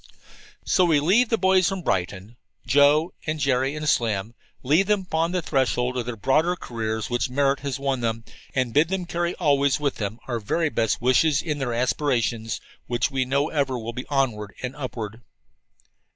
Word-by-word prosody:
So 185 - +3
we 160 -4 +4
leave 205 +11 +3
the 225 - +2
boys 190 -3 +3
from 195 -2 -4
Brighton 95 - -2 0.3
Joe 145 +5 +4
and 155 0 -1
Jerry 135 0 +1
and 150 0 -4
Slim 110 -5 0 0.3
leave 155 +9 +3
them 210 -2 +2
upon 165 -2 -1
the 180 -2 -1
threshold 130 -3 0
of 125 -2 -3
the 120 -2 -4
broader 155 - +2
careers 110 - -4
which 120 +2 0
merit 140 +1 +1
has 140 -2 -3
won 135 -2 -1
them, 115 -1 -2 0.3
and 130 -3 0
bid 150 +3 +4
them 185 0 -2
carry 170 0 -2
always 140 -4 +2
with 145 -2 -1
them 105 +1 -3
our 120 -3 -2
very 160 +10 0
best 115 -5 0
wishes 140 +4 +3
in 150 -3 -3
their 125 -4 -2
aspirations 120 -3 0 0.3
which 120 +2 0
we 130 -1 0
know 140 +3 0
ever 140 -4 0
will 115 0 -5
be 125 - -6
onward 120 -8 -1
and 125 +1 -4
upward. 115 -5 -6
135 Hz, 180 wpm, -24 LUFS, 120-155 Hz, 0.3 s, we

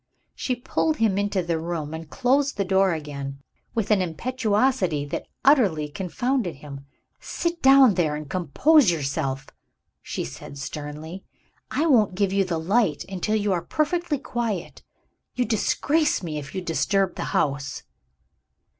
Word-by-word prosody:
She 255 - -2
pulled 305 +5 -1
him 210 -5 +2
into 200 -2 0
the 170 -1 -1
room 160 -2 -4
and 160 -1 -7
closed 270 - +1
the 200 - 0
door 190 0 +3
again, 140 -3 -5 0.4
with 225 -2 0
an 205 -3 +4
impetuosity 205 - 0
that 145 - -5 0.2
utterly 200 - +4
confounded 190 - -2
him. 140 -1 -10 0.3
"Sit 340 0 -3
down 270 -4 +7
there, 160 -5 +1
and 150 0 -6
compose 200 - +4
yourself!" 140 -3 -2 0.5
she - - -4
said 140 - -9
sternly. 150 +5 -7 0.5
"I 310 - 0
won't 220 - +4
give 195 0 +1
you 195 0 +3
the 180 -3 -2
light 195 0 +1
until 195 +3 -1
you 205 -2 +1
are 175 - 0
perfectly 310 - -1
quiet. 230 -9 -4 0.5
You 250 - +1
disgrace 295 - +1
me 155 -3 -3
if 145 0 -9
you 190 - -2
disturb 190 +3 +1
the - - -4
house." 140 -1 -1
190 Hz, 145 wpm, -24 LUFS, 155-245 Hz, 0.5 s, down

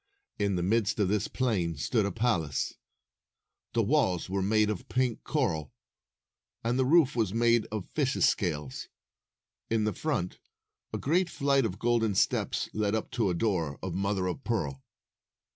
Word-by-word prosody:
In 100 -2 +1
the 90 - -1
midst 110 +2 +1
of 100 -3 +2
this 105 -1 +1
plain 100 -11 0
stood 105 - +1
a - - -2
palace. 85 - 0 1.0
The 115 - +2
walls 100 - +1
were 100 0 0
made 105 +2 +3
of 100 - -6
pink 125 -2 0
coral, 90 - -1 0.9
and 120 +3 0
the 130 - +3
roof 150 -4 +5
was 110 -4 0
made 115 -1 +3
of 110 -4 -4
fishes' 135 -3 +2
scales. 75 -8 -2 0.8
In 110 -1 +1
the 105 -1 0
front, 90 - -2 0.5
a - - -2
great 175 +5 +1
flight 140 -3 +2
of 95 -2 -7
golden 115 -2 +1
steps - - +1
led 105 0 0
up 110 - -3
to 110 -5 +1
a 90 - 0
door 85 -7 0
of 95 -2 -3
mother 100 0 0
of 90 +9 -3
pearl. 75 - -2
105 Hz, 160 wpm, -29 LUFS, 90-120 Hz, 1.0 s, roof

